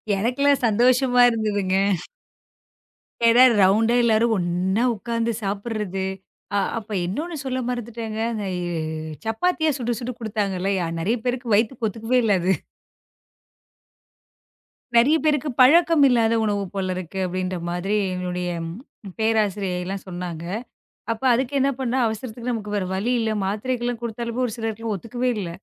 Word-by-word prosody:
எனக்கெல்லாம் 265 +7 +2
சந்தோஷமா 245 +3 +4
இருந்ததுங்க. 205 -4 0 1.5
ஏன்னா, 235 +2 +7 0.2
ரவுண்டா 215 +5 +4
எல்லாரும் 230 0 +3
ஒண்ணா 180 +4 0
உட்காந்து 230 +2 -2
சாப்பிறது. 200 -1 -3 0.5
அ - - +3 0.2
அப்ப 215 0 -13
இன்னொன்னு 310 - -3
சொல்ல 260 -1 -1
மறந்துட்டேங்க. 230 -2 -4 0.3
எ 180 -1 -3 0.7
சப்பாத்தியா 315 +8 +1
சுட்டு 240 -2 -2
சுட்டு 250 +1 -4
குடுத்தாங்கல்ல. 200 -4 -2 0.3
நிறைய 215 +9 0
பேருக்கு 245 -3 -1
வயித்துக்கு 225 +2 +1
ஒத்துக்கவே 225 +4 0
இல்ல 210 -3 +3
அது. 185 +2 +2 2.4
நிறைய 250 +7 +6
பேருக்கு 300 -1 +1
பழக்கம் 325 +3 +6
இல்லாத 230 -2 +3
உணவு 205 -2 0
போல 190 -2 -2
இருக்கு 185 +1 -6
அப்படின்ற 185 0 -2
மாதிரி 180 +4 -1 0.2
எங்களுடய 180 -1 -3 0.7
பேராசிரியை 210 -4 +1
எல்லாம் 195 +1 -5
சொன்னாங்க. 175 -2 -5 0.7
அப்ப 230 +2 -5
அதுக்கு 260 +3 -1
என்ன 270 +1 +3
பண்ண? 250 -2 -1
அவசரத்துக்கு 230 +2 -4
நமக்கு 210 -2 -4
வேற 200 -2 -1
வழி 210 +6 -1
இல்ல. 225 -1 0
மாத்திரைகள் 240 +5 -2
எல்லாம் 245 -1 -3
கொடுத்தாலும் 235 +1 -3
ஒரு 230 - -3
சிலருக்கு 225 0 -3
ஒத்துக்கவே 240 +6 -2
இல்ல. 190 -5 -3
225 Hz, 125 wpm, -23 LUFS, 195-245 Hz, 2.4 s, ஏன்னா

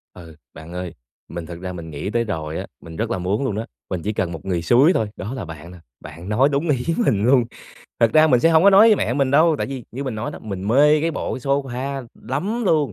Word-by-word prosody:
Ừ. 85 -3 -12 0.2
Bạn 80 +2 -11
ơi, 90 -2 -5 0.3
mình 85 -2 -6
thực 85 0 -9
ra 90 0 -5
mình 85 -2 -8
nghĩ 75 +6 -5
tới 120 +1 0
rồi 80 -6 -4
á, - - -5
mình 80 -1 -11
rất 115 +4 -2
là 95 - -1
muốn 95 +8 -1
luôn 125 -6 -1
đó, 110 +2 -4 0.2
mình 90 -3 -3
chỉ 105 - -2
cần 90 -4 -2
một 80 -3 -8
người 90 -3 -1
xúi 130 - +5
thôi, 110 - 0
đó 110 +7 -5
là 130 - -5
bạn 80 0 -10
nè, 90 - -12 0.2
bạn 85 +5 -10
nói 125 +7 +3
đúng 145 +3 -1
ý 130 -4 0 0.2
mình 100 -1 +2
luôn. 125 -1 +5 0.6
Thực 115 -1 +4
ra 155 0 +6
mình 125 -5 +3
sẽ 165 - +4
hông 160 -1 +5
có 200 - +8
nói 200 +4 +7
với 215 - +5
mẹ 120 - -1
mình 135 -1 +1
đâu, 155 +3 +4
tại - - -1
vì 135 -3 -6
như 135 +4 -5
mình 130 -4 -3
nói 110 +2 -4
đó, - - -9
mình 100 -2 -5
mê 150 +5 +5
cái 165 +2 0
bộ 155 - -4
cái - - -6
sofa 135 -1 -2 0.2
lắm 200 - -2
luôn, 155 -7 +2
120 Hz, 275 wpm, -21 LUFS, 90-140 Hz, 0.6 s, có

